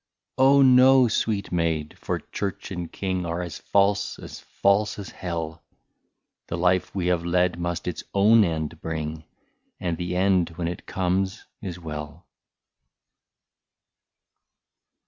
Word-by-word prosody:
" - - -63
Oh! 135 +1 +6
no, 130 0 +7
sweet 105 -2 -1
maid, 80 -3 -1
for - - -2
Church 100 0 -5
and 90 -3 -5
King 95 -2 -2
Are 85 +1 -3
as 85 -3 -7
false 100 0 +1
as - - -9
false 100 +2 +1
as 100 -2 -7
Hell; 85 -2 -5 0.9
The 85 - -3
life 90 +2 +1
we 95 -3 -1
have 90 -1 +1
led 90 0 +1
must 85 0 -3
its 90 - -3
own 105 +3 +5
end 80 -2 -3
bring. 80 -1 -4 0.5
And 85 -2 -2
the 90 0 -3
end 90 -2 +2
when 85 -2 -2
it 85 - -6
comes 95 +2 -1 0.2
is 90 -5 -5
well." 75 0 -7
90 Hz, 135 wpm, -25 LUFS, 85-100 Hz, 0.9 s, no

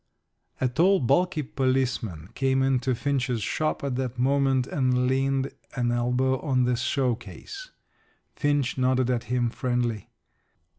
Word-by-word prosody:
A 130 - +2
tall, 175 +10 +3
bulky 150 +5 +1
policeman 130 - -1
came 135 0 +1
into 130 -1 +1
Finch's 130 -4 -1
shop 155 +5 -1
at 135 -3 -2
that 130 -2 -3
moment 135 0 +2
and 125 -2 +1
leaned 135 +1 +1 0.2
an 120 -2 0
elbow 125 +2 +1
on 130 -4 +1
the 125 0 +2
showcase. 130 - -3 0.7
Finch 145 -3 0
nodded 130 0 +2
at 120 -1 -1
him 120 0 0
friendly. 120 -5 -2
130 Hz, 130 wpm, -26 LUFS, 125-135 Hz, 0.7 s, tall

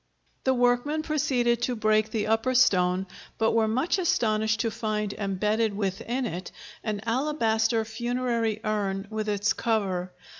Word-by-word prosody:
The 265 - +4
workmen 245 +5 +1
proceeded 245 -6 +1
to 250 0 0
break 215 0 +2
the 215 -1 -1
upper 225 +4 +1
stone, 185 -6 +3 0.3
but 225 0 +2
were 225 -1 +2
much 260 - +1
astonished 220 -9 +1
to 230 -2 -1
find 215 -2 -2
embedded 210 +1 0
within 215 +6 -2
it 180 -4 -5 0.3
an 210 -2 -2
alabaster 230 -3 +1
funerary 235 -1 -1
urn 200 -2 -1
with 215 -1 -2
its 205 +1 +1
cover. 190 -5 -1
220 Hz, 140 wpm, -27 LUFS, 210-240 Hz, 0.3 s, The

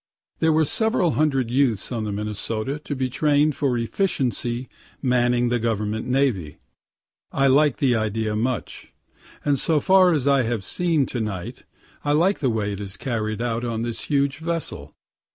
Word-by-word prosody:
There 160 -1 +3
are 160 - +4
several 220 - +1
hundred 135 -6 +1
youths 125 -5 +1
on 115 -3 -2
the 105 - -3
Minnesota 110 +6 -3
to 150 -1 -5
be 130 -1 -1
train'd 145 +3 +2
for 135 -4 0
efficiently 125 - -1 0.3
manning 125 -2 +2
the 120 0 +1
government 110 -1 -2
navy. 125 - 0 0.7
I 135 - +1
like 140 +1 +4
the 130 -4 +2
idea 110 0 -1
much; 120 +2 -3 0.5
and, 145 -2 +2
so 155 +2 +2
far 185 +1 +5
as 145 -5 0
I 140 -1 +4
have 115 -3 -2
seen 165 - +1
to 125 - -4
night, 105 +2 -5 0.4
I 145 - +1
like 175 +7 +2
the 135 - +1
way 105 -3 -1
it 100 - -6
is 100 -1 -6
carried 110 -3 -2
out 115 0 -2
on 115 -2 -2
this 120 -1 -4
huge 140 -1 0
vessel. 160 - -4
125 Hz, 170 wpm, -23 LUFS, 110-145 Hz, 0.7 s, far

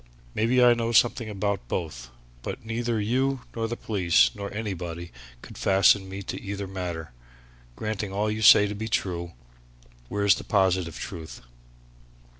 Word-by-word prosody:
"Maybe 125 +3 +3
I 120 -1 +7
know 115 -1 -1
something 115 0 +3
about 100 - -2
both, 65 -6 -4 0.3
but 110 - -6
neither 115 0 -1
you 130 +5 0
nor 115 -1 -1
the 120 +1 -4
police 90 -6 +3
nor 100 -1 -6
anybody 90 -5 -5 0.3
could - - -11
fasten 95 0 +4
me 95 +1 -6
to - - -6
either 100 0 -4
matter! 90 -5 -5 0.6
Granting 105 - -3
all 105 +2 0
you 110 +1 -3
say 105 -1 +8
to 105 - -3
be 110 +2 -5
true, 85 -5 -2 0.8
where's 100 -1 +3
the - - -5
positive 95 -4 +1
truth?" 80 -2 -8
100 Hz, 150 wpm, -26 LUFS, 90-110 Hz, 0.8 s, say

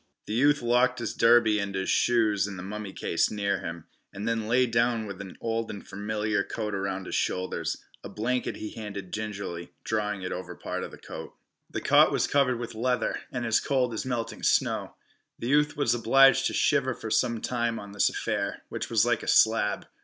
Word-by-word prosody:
The - - -4
youth 145 +4 +3
locked 125 +1 +3
his 115 -3 -3
derby 115 -2 +5
and 100 -1 -3
his 95 0 -1
shoes 110 -4 +2
in 100 -2 -7
the 90 - -6
mummy 105 +1 -6
case 85 - 0
near 100 -1 -1
him, 85 -1 -6 0.3
and 100 +3 -5
then 115 -2 -1
lay 125 +3 +4
down 115 -1 +1
with 100 -1 -7
an 95 -2 -9
old 115 0 -2
and 100 - -8
familiar 105 +1 -1
coat 105 0 -4
around 95 -1 -3
his - - -7
shoulders. 90 0 -1 0.3
A - - -7
blanket 125 +4 -2
he 110 - -6
handed 100 -4 -7
gingerly, 100 -5 -5
drawing 105 -3 -2
it 90 - -3
over 90 -1 -5
part - - -4
of - - -5
the - - -12
coat. - - -9 0.3
The - - -4
cot - - +5
was - - +1
covered 135 -3 +2
with 120 0 -6
leather, 125 +3 0
and 120 -2 -3
as 115 -1 +3
cold 130 -4 0
as 110 - -3
melting 120 -3 -3
snow. - - +1 0.4
The 120 - -4
youth 150 +1 +3
was 145 - +2
obliged 135 +3 +5
to - - -3
shiver 130 -3 +2
for 110 - -7
some 120 -1 +2
time 120 0 -1
on 100 -1 -8
this 105 - +3
affair, - - -3
which - - -4
was - - +3
like - - +1
a - - -8
slab. 110 -2 +3
110 Hz, 205 wpm, -27 LUFS, 100-120 Hz, 0.4 s, derby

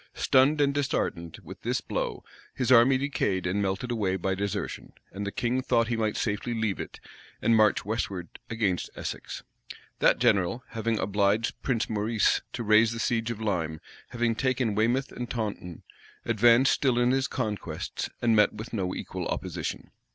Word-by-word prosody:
[*] - - -40
Stunned 135 +3 +3
and 140 -1 +3
disheartened 85 - -2
with - - -11
this - - 0
blow, - - -3 0.3
his 125 0 0
army 125 +2 +7
decayed 115 -9 -1
and 95 +3 0
melted 100 +6 -2
away 100 -5 0
by 95 +1 -1
desertion; 100 +1 -4 0.2
and 100 +1 -5
the - - -2
king 125 +4 0
thought 115 -2 +1
he 120 - 0
might 110 -2 -1
safely 110 +2 -2
leave 110 -3 -1
it, - - -7 0.4
and 115 - +3
march 110 -3 +3
westward 100 -5 -4
against 105 -6 -1
Essex. - - -6 0.6
That - - +4
general, 100 +6 +2
having 115 -1 -1
obliged 100 +3 0
Prince 120 -4 0
Maurice 110 +1 +1
to 120 - -3
raise 110 +1 +4
the 115 - -5
siege 115 -1 0
of 115 -2 -4
Lyme, 85 -8 -2 0.3
having 120 -1 0
taken 125 -2 0
Weymouth 120 +6 +1
and 120 -1 -6
Taunton, 105 -7 -4 0.4
advanced 120 +3 +5
still 130 -4 +1
in 120 0 +3
his 135 -1 +1
conquests, 110 -6 -4
and 115 -2 +4
met 105 -1 +4
with 110 +3 -8
no 95 -4 -2
equal - - -5
opposition. - - -4
110 Hz, 170 wpm, -27 LUFS, 100-120 Hz, 0.6 s, army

